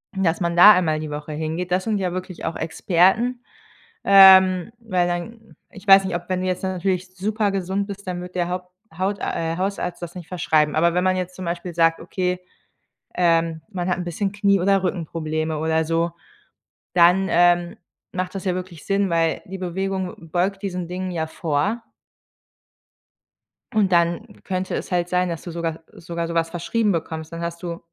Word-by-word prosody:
Dass 185 -2 0
man 170 -1 0
da 205 +5 +10
einmal 160 -5 +1
die 155 0 -5
Woche 150 +1 -6
hingeht. 160 +4 -3
Das 185 +1 +1
sind 220 -2 0
ja 185 -2 -1
wirklich 185 -1 -6
auch - - -2
Experten. 190 +9 +1 0.6
Ähm, 190 -1 +7
weil 185 -6 0
dann 220 +6 -6 0.2
ich 205 -1 -14
weiß 195 0 +8
nicht, 185 -2 -2
ob 175 0 -4
wenn 185 -1 0
du 185 - -2
jetzt 185 0 -1
natürlich 185 0 -2
super 210 +2 0
gesund 195 +1 -2
bist, 200 -1 -8
dann 180 -1 -3
wird 180 0 -9
der 175 -1 0
Haupt 180 0 -5 0.3
Haut 195 +2 -1
äh, 165 0 -2
Hausarzt 185 -2 -3
das 175 0 -6
nicht 175 -3 -9
verschreiben. 155 -4 +1
Aber 170 +2 +3
wenn 180 +1 +1
man 185 0 +2
jetzt 185 0 -4
zum 185 - -7
Beispiel 170 +1 -4
sagt: 165 0 +3
„Okay, 180 +1 -2 0.8
ähm, 165 -2 +2
man 180 -4 -4
hat 180 - +1
'n 180 - -3
bisschen 190 +4 -2
Knie 200 -1 +2
oder 195 +1 +2
Rückenprobleme“ 160 -3 -2
oder 160 0 +1
so, 165 +1 0 0.8
dann, 180 +2 +5
ähm, 175 0 +3 0.4
macht 185 0 -3
das 195 - -5
ja 185 -2 0
wirklich 180 -4 -8
Sinn, 200 0 +1
weil 165 -1 +1
die 195 +1 -7
Bewegung 185 -2 -4
beugt 190 +3 0
diesen 180 -3 -4
Dingen 185 +1 -4
ja 160 -2 -2
vor. 170 +8 -1 1.9
Und 205 -3 +2
dann 175 +5 0
könnte 185 -1 -3
es - - -5
halt 175 -1 0
sein, 180 0 +1
dass 165 -2 -4
du 175 - -7
sogar 165 -1 -3
sogar 170 0 -5
sowas 165 0 0
verschrieben 205 +6 0
bekommst. 160 -2 -4
Dann 165 0 -6
hast 170 +1 -5
du, 170 -1 -4
180 Hz, 185 wpm, -22 LUFS, 170-190 Hz, 1.9 s, da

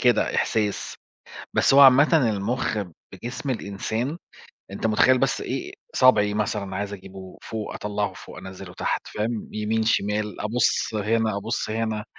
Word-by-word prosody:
كده 120 -3 +3
إحساس، 105 -2 0 0.6
بس - - +3
هو 140 - +7
عامةً 140 0 +6
المُخّ 110 +3 -1 0.3
بجسم 125 +3 -6
الإنسان، 115 - -3 0.5
أنت 100 - -2
مُتخيّل 125 +4 +4
بس - - +1
إيه - - -4 0.2
صابعي 105 -5 +5
مثلًا 105 -2 -2
عايز 100 +1 -3
أجيبه 95 -1 -10
فوق، 110 -2 -5
أطلّعه 105 0 -2
فوق، - - -11
أنزِلُه 95 -1 -9
تحت، - - -2
فاهم، 110 +1 -3
يمين، 110 +1 0
شمال 105 -1 0
أبُص 110 +1 +1
هنا، 110 0 +1
أبُص 110 +2 -3
هنا 110 -1 -2
110 Hz, 140 wpm, -24 LUFS, 105-115 Hz, 0.6 s, هو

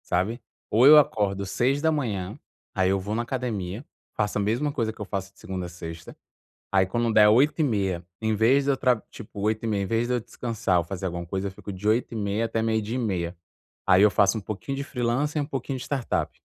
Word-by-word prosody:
Sabe? 105 +7 -1 0.3
Ou 115 +4 +4
eu 155 +1 +10
acordo 100 -8 +2
6h, 125 - 0 0.3
aí 95 -1 +2
eu 95 0 +2
vou 105 +3 -3
na 120 - 0
academia, 115 -3 -4 0.3
faço 105 - -1
a - - +1
mesma 120 +9 0
coisa 115 -6 -1
que - - -22
eu - - -3
faço 95 0 -5
de - - -25
segunda 95 -4 -5
a - - -9
sexta, 85 -1 -9 0.6
aí 95 -1 +4
quando 115 +4 0
der 105 -1 +7
8h30 110 - +2 0.2
em 110 -1 +1
vez 130 +6 +3
de 140 - +3
eu 135 - 0
tra 125 -4 +2
tipo 105 -2 -10
8h30 110 -1 0
em - - -2
vez 115 +4 0
de 125 - 0
eu - - 0
descansar 115 -5 -1
ou - - -1
fazer 95 +2 -6
alguma 85 -1 -3
coisa, 95 +3 -3
eu - - -5
fico 100 +2 -9
de 95 +2 -5
8h30 110 -1 0
até 115 0 -1
12h30 110 -5 -1 0.5
aí 90 +1 +6
eu 105 - +6
faço 100 +1 +3
um - - -4
pouquinho 110 +7 -5
de 140 - -2
freelancer 135 +3 -1
e - - -2
um - - -15
pouquinho 135 -2 -4
de - - -6
startup. 135 -4 -1
110 Hz, 215 wpm, -25 LUFS, 95-125 Hz, 0.6 s, eu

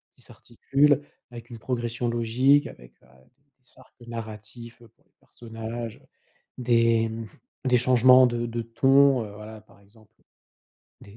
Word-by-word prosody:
qui - - -26
s'articulent 140 +4 0 0.3
avec 120 -1 -12
une 115 -2 -10
progression 120 0 -4
logique 120 +5 +2
avec, - - -15
heu, - - -24 0.5
des 130 - -22
arcs 130 - -21
narratifs 115 +1 -9 0.2
pour - - -36
les - - -41
personnages, 115 0 -8
heu, - - -26 0.5
des 115 -2 +2
mmh, 110 0 -7 0.4
des 125 -1 +3
changements 125 +1 +5
de 120 -1 -3
de 115 0 -4
ton, 135 +3 +3
heu, 100 - -11
voilà, 110 +1 -11
par 105 -1 -24
exemple, 110 +1 -24 0.9
des 100 +2 -15
115 Hz, 145 wpm, -25 LUFS, 115-125 Hz, 0.9 s, changements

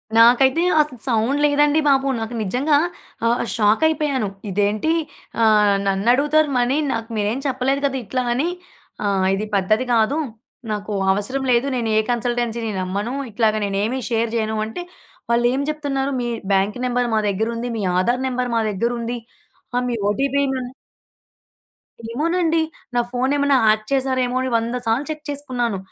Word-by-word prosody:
నాకైతే 250 +7 +5 0.2
అసల 295 -4 -4
సౌండ్ 240 +4 +1
లేదండి 295 +1 +3
బాబు. 275 -1 +3
నాకు 225 +1 -5
నిజంగా 265 +9 +2 0.5
ఆహ్, 235 +1 +2
షాకయిపోయాను. 270 +3 +2 0.2
ఇదేంటి 205 - +1 0.5
ఆహ్, 210 -2 +5
నన్నడుగుతారు 275 +10 +3
మనీ 245 +3 +1 0.2
నాకు 225 0 -4
మీరేం 210 +4 0
చెప్పలేదు 270 +1 0
కదా! 270 -1 0
ఇట్లా 255 +5 -1
అని 270 +7 0 0.6
ఆహ్, 195 -2 +1
ఇది 215 +2 -3
పద్ధతి 215 +6 +2
కాదు 230 +6 +2 0.5
నాకు 210 0 -3 0.2
అవసరం 230 +8 -2
లేదు. 240 +3 +3
నేను 235 -3 -1
ఏ - - +6
కన్సల్టెన్సీని 235 -1 -1
నమ్మను. 200 +6 -3 0.2
ఇట్లాగా 215 0 +1
నేను 195 -1 -2
ఏమి 255 +5 -1
షేర్ 230 -1 0
చేయను 220 -1 -1
అంటే 290 +11 -6 0.5
వాళ్ళేం 240 +3 +2
చెప్తున్నారు, 280 -2 -2
మీ 240 - -2 0.3
బ్యాంక్ 195 +4 +1
నెంబర్ 245 0 0
మా - - +3
దగ్గరుంది, 230 +4 -2
మీ - - -2 0.2
ఆధార్ 240 +7 +1
నెంబర్ 250 -1 -2
మా 225 - +2
దగ్గరుంది 235 +3 -2 0.7
మీ 240 - -1
ఓటీపీ 275 +7 +1
మా 265 - -2 1.5
ఏమోనండి. 330 +4 +1 0.3
నా 240 - +3
ఫోన్ 255 +2 0
ఏమన్నా 285 -1 +3
హ్యాక్ 215 0 +3
చేశారేమో 260 -2 0
అని 260 - -1
వంద 230 +2 -2
సార్లు 235 +6 +1
చెక్ 305 -1 -5
చేసుకున్నాను. 255 -7 -2
245 Hz, 145 wpm, -21 LUFS, 220-275 Hz, 1.5 s, ఏ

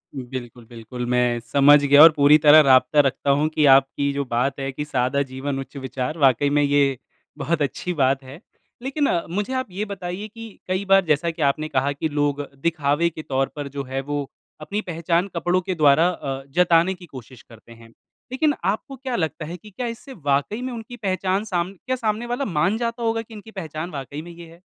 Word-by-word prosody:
बिल्कुल, 125 -2 -7
बिल्कुल 120 +1 -7
मैं 125 -1 +1
समझ 140 +5 +5
गया 145 +1 +6
और 165 - +10
पूरी 145 +1 +6
तरह 150 +1 +7
राब्ता 130 +1 +4
रखता 135 +1 -1
हूँ 145 +2 +3
कि 155 -1 +1
आपकी 135 +1 +1
जो 140 0 -2
बात 130 +3 -1
है 135 0 -3
कि 150 +3 -5
सादा 135 0 0
जीवन 135 +1 -4
उच्च 135 - -9
विचार, 130 +3 -4
वाक़ई 140 -1 +3
में 145 +1 +2
ये 140 -2 +2 0.4
बहुत 165 -1 -1
अच्छी 145 +6 -2
बात 135 -2 +1
है। 135 +4 -11 0.4
लेकिन 275 +2 -1 0.2
मुझे 205 +8 -3
आप 260 -2 -2
ये 205 +4 -3
बताइए 195 0 -6
कि 225 -1 -12
कई 185 +2 -1
बार 195 -1 +4
जैसा 155 +1 +1
कि 160 - -9
आपने 150 +2 +1
कहा 140 -1 0
कि 145 +3 -3
लोग 145 -1 0 0.2
दिखावे 160 0 +1
के 160 -1 -9
तौर 135 0 -1
पर 145 -2 -5
जो 140 0 -5
है, 135 +1 -4
वो 145 0 -4 0.3
अपनी 205 +7 -3
पहचान 170 +1 -1
कपड़ों 175 +2 +1
के 185 0 -3
द्वारा 155 +1 +4
अ, 135 -6 -5
जताने 175 +3 +3
की 180 -1 -13
कोशिश 130 -5 -12
करते 115 0 -18
हैं, 115 0 -15 0.4
लेकिन 295 +3 +1
आपको 220 +7 -2
क्या 260 -2 -4
लगता 160 -3 -2
है 175 +3 -7
कि 210 - -15
क्या 245 +5 -4
इससे 235 +4 -8
वाक़ई 145 - -1
में 255 0 -4
उनकी 230 +1 -8
पहचान 190 -1 -1
साम 180 -2 -2
क्या 255 +7 -4
सामने 220 -1 -2
वाला 245 +3 -2
मान 185 +4 0
जाता 235 0 -3
होगा 225 0 0
कि 225 0 -14
इनकी 220 +1 -11
पहचान 160 -3 -6
वाक़ई 145 +1 -6
में 175 - -11
ये 170 0 -12
है? 170 - -18
155 Hz, 210 wpm, -22 LUFS, 135-190 Hz, 0.4 s, और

